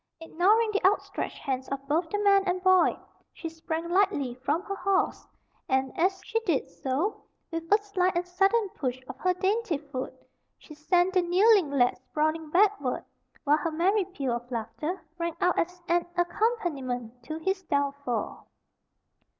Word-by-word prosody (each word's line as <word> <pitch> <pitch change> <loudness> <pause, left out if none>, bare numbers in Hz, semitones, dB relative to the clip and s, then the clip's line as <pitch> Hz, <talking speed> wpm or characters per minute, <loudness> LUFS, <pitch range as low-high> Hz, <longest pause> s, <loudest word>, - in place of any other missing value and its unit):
Ignoring 400 +7 +2
the 410 - -1
outstretched 390 +3 0
hands 265 -2 -3
of 275 0 -5
both 320 +3 +1
the 415 - -1
man 400 -1 +4
and 365 0 -1
boy, 370 -1 +5 0.3
she 330 - -7
sprang 325 +1 -4
lightly 340 -9 +1
from 285 +7 -1
her 395 - -4
horse, 390 0 0 0.4
and, 265 -1 +1
as 380 +3 +1
she 455 - 0
did 345 - 0
so, 285 +11 -2 0.3
with 330 +1 -5
a 415 - +8
sly 400 -3 0
and 350 +1 -1
sudden 390 +5 +2
push 255 -7 -3
of 265 - -7
her 365 -1 +1
dainty 390 -2 0
foot, 280 -3 -6 0.4
she 305 - -14
sent 355 +5 +2
the 370 - +4
kneeling 370 0 +4
lad 255 -3 +2
sprawling 310 +3 -1
backward, 365 -7 +2 0.4
while 295 +1 +4
her 310 +2 -2
merry 370 +5 +2
peal 280 -10 -3
of 240 +1 -5
laughter 300 - -4 0.2
rang 335 -1 -2
out 360 - +2
as 360 +1 -2
an 345 0 +2
accompaniment 300 - -1
to 310 +6 -6
his 380 +4 -1
downfall. 280 - -2
340 Hz, 160 wpm, -28 LUFS, 280-380 Hz, 0.4 s, a